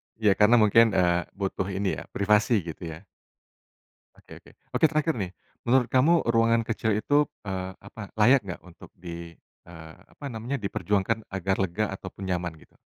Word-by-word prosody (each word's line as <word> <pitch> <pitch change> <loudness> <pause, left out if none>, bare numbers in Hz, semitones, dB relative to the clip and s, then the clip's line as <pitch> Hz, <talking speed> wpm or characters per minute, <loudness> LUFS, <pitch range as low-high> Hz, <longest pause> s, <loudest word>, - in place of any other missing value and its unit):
Ya 110 -3 +3
karena 105 +3 +6
mungkin, 110 -1 +5
eee, 85 -1 +2
butuh 95 -1 -2
ini 95 0 -2
ya - - -8
privasi 105 +1 +3
gitu 85 +1 -7
ya. 85 - -14 1.1
Oke - - -22
oke. - - -19 0.2
Oke, - - +4
terakhir 155 +1 0
nih. 95 -2 -3 0.4
Menurut 125 0 +4
kamu 155 +6 +4
ruangan 115 0 +3
kecil 110 -1 -1
itu, 145 +6 +2 0.2
eee, 95 -2 -4
apa, 100 +2 -11
layak 120 +5 +5
nggak 90 - -7
untuk 90 -2 -15
di 85 -1 -9 0.3
eee, 80 -2 -11 0.2
apa 145 - -11
namanya 115 +5 -4
diperjuangkan 105 +2 -1
agar 95 0 -1
lega 95 +3 0
ataupun 95 0 -8
nyaman 90 -2 -2
gitu? 80 - -21
100 Hz, 165 wpm, -26 LUFS, 90-115 Hz, 1.1 s, karena